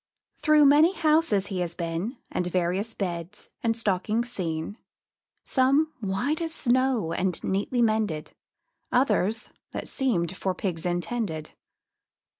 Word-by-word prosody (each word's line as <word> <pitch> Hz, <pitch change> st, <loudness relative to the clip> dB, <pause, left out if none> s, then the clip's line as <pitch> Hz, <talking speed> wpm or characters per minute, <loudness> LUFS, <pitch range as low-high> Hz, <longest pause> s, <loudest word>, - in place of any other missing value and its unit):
Through 305 Hz, -1 st, +5 dB
many 300 Hz, +6 st, +6 dB
houses 310 Hz, -, +3 dB
he 195 Hz, -2 st, -3 dB
has 170 Hz, -1 st, -2 dB
been, 170 Hz, +9 st, -3 dB
And 180 Hz, -, -1 dB
various 185 Hz, +5 st, -1 dB
beds 175 Hz, 0 st, -5 dB
and 225 Hz, -1 st, +1 dB
stockings 220 Hz, +3 st, 0 dB
seen; 170 Hz, +1 st, -3 dB, 0.6 s
Some, 280 Hz, +4 st, +2 dB
white 235 Hz, -, -1 dB
as 325 Hz, -1 st, -1 dB
snow, 250 Hz, -8 st, +2 dB
and 180 Hz, 0 st, 0 dB
neatly 205 Hz, +6 st, 0 dB
mended, 215 Hz, -9 st, 0 dB, 0.6 s
Others, 225 Hz, -4 st, +1 dB, 0.2 s
that -, -, -4 dB
seemed 190 Hz, -, 0 dB
for 190 Hz, -1 st, -2 dB
pigs 180 Hz, -3 st, -2 dB
intended. 175 Hz, -3 st, -2 dB
210 Hz, 120 wpm, -26 LUFS, 180-255 Hz, 0.6 s, many